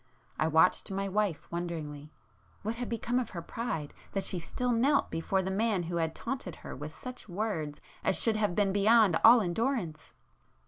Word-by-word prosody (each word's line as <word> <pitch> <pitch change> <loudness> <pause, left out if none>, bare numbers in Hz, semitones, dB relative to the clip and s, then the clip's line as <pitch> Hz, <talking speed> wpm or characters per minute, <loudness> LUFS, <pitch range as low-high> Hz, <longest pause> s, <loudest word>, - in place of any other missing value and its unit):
I 155 - +3
watched 160 +3 +3
my 195 0 -2
wife 195 -4 0
wonderingly—what 165 +4 -6
had 245 0 -4
become 235 +2 0
of 250 - -3
her 170 - -6
pride 200 -10 -4 0.2
that 195 - 0
she 180 - -1
still 250 +8 -2
knelt 270 +5 +2
before 175 +4 0
the 190 - -2
man 205 -2 +1
who 170 +1 -3
had 160 -1 -1
taunted 235 - -4
her - - -6
with 150 +2 -8
such 250 -4 -8
words 175 -7 -3 0.2
as - - +3
should 225 -2 +3
have 210 -4 0
been 200 -2 +2
beyond 205 -3 +5
all 235 +1 +9
endurance? 180 - -2
195 Hz, 175 wpm, -30 LUFS, 165-230 Hz, 0.2 s, all